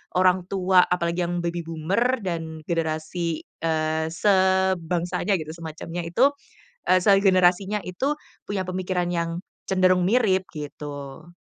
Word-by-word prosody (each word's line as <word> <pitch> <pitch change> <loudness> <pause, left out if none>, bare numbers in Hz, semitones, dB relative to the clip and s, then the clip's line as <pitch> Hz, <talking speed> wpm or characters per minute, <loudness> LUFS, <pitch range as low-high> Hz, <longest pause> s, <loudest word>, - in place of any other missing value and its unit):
orang 185 0 +4
tua, 185 -1 +4
apalagi 175 0 0
yang 175 0 -2
baby 170 0 -2
boomer 190 +11 0
dan 165 -3 -4
generasi, 165 0 -2 0.2
eee, 160 -1 0
sebangsanya 190 -1 +1
gitu, 155 0 -6
semacamnya 165 +1 -6
itu, 245 +12 +4 0.6
eee, 185 - +5
segenerasinya 195 0 +4
itu 260 +13 -1 0.3
punya 200 -2 -2
pemikiran 185 -1 -2
yang 170 0 -2 0.3
cenderung 185 -1 +3
mirip 200 -3 +3
gitu. 145 0 -7
180 Hz, 115 wpm, -24 LUFS, 165-190 Hz, 0.6 s, eee